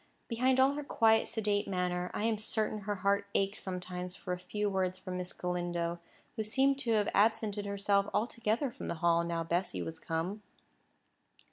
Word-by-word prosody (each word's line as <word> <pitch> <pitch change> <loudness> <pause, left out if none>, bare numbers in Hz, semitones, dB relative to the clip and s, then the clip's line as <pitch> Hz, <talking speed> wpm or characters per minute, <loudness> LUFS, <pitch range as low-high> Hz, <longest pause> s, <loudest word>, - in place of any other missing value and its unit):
Behind 255 +2 +2
all 265 +2 +5
her 295 +1 -4
quiet, 225 -5 +3
sedate 205 -2 0
manner, 180 -1 -1
I - - -3
am 225 -1 +1
certain 215 0 0
her 205 0 -2
heart 200 0 +3
ached 195 +2 +1
sometimes 180 -1 -4
for 180 - -4
a 180 - -4
few 210 +3 -2
words 185 -2 0
from 185 -1 -5
Miss 180 0 -4
Galindo, 175 -1 -2 0.4
who 220 - -1
seemed 270 +5 +3
to 240 -5 +1
have 210 -1 +2
absented 210 -1 +2
herself 200 0 +1
altogether 230 +3 0
from - - -7
the - - -2
Hall 170 0 +4
now 170 -1 -1
Bessy 175 +3 -1
was 160 0 -5
come. 175 +6 -3
200 Hz, 175 wpm, -32 LUFS, 180-220 Hz, 0.4 s, all